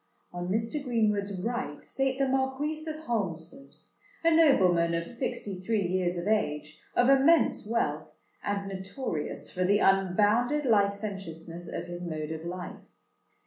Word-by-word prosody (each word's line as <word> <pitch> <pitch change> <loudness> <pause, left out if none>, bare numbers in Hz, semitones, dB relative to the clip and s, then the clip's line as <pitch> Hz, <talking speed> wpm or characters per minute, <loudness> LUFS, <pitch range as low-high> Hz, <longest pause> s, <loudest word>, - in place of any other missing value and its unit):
On 175 0 -4
Mr. 225 +8 -1
Greenwood's 210 -6 0
right 240 +2 -3
sate 270 -1 -1
the 275 0 +2
Marquis 270 +4 -1
of 310 0 -6
Holmesford—a 235 - -3
nobleman 180 - +4
of 170 0 -1
sixty 240 -5 -4
three 200 +1 0
years 180 0 0
of 175 +3 -3
age, 155 -8 -1 0.2
of 245 - +4
immense 275 -4 +4
wealth, 235 - 0 0.3
and 200 -1 -2
notorious 190 - -4
for 185 - -1
the 200 +3 +4
unbounded 210 +9 +3
licentiousness 195 -6 -1
of - - -4
his 175 0 -6
mode 155 -2 -4
of 160 0 -5
life. 180 +1 -6
200 Hz, 135 wpm, -29 LUFS, 175-255 Hz, 0.3 s, nobleman